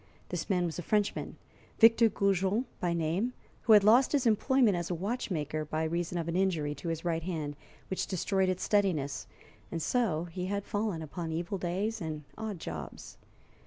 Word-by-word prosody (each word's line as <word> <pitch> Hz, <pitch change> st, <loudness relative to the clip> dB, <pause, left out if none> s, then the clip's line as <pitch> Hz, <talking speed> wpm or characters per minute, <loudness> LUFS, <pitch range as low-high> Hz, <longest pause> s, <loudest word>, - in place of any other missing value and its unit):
This 175 Hz, -2 st, -4 dB
man 180 Hz, -3 st, +2 dB
was 170 Hz, 0 st, -3 dB
a -, -, -2 dB
Frenchman, 205 Hz, +4 st, -1 dB, 0.4 s
Victor 225 Hz, 0 st, +7 dB
Goujon 200 Hz, +3 st, +1 dB
by 175 Hz, -, 0 dB
name, 170 Hz, +9 st, 0 dB, 0.3 s
who 225 Hz, -, +5 dB
had 210 Hz, -2 st, +8 dB
lost 240 Hz, +7 st, +5 dB
his 275 Hz, -3 st, +2 dB
employment 235 Hz, 0 st, +4 dB
as 175 Hz, -1 st, -3 dB
a 180 Hz, -, -1 dB
watchmaker 165 Hz, -, -2 dB
by 155 Hz, +1 st, -2 dB
reason 170 Hz, +2 st, -1 dB
of 165 Hz, -1 st, -2 dB
an 170 Hz, -, -2 dB
injury 170 Hz, -6 st, +1 dB
to 150 Hz, +4 st, -8 dB
his 165 Hz, +1 st, -3 dB
right 165 Hz, -1 st, 0 dB
hand, 155 Hz, -4 st, -3 dB, 0.3 s
which 190 Hz, -, -2 dB
destroyed 190 Hz, +1 st, +1 dB
its 185 Hz, -1 st, -1 dB
steadiness, 160 Hz, -10 st, +1 dB, 0.4 s
and 170 Hz, -, -2 dB
so 175 Hz, -4 st, +1 dB
he 180 Hz, +1 st, -5 dB
had 200 Hz, +1 st, -2 dB
fallen 205 Hz, -6 st, -2 dB
upon 160 Hz, +2 st, -5 dB
evil 170 Hz, +4 st, -3 dB
days 195 Hz, +5 st, -2 dB
and 155 Hz, -2 st, -4 dB
odd 220 Hz, -3 st, -4 dB
jobs. 80 Hz, -, -7 dB
180 Hz, 180 wpm, -31 LUFS, 160-205 Hz, 0.4 s, had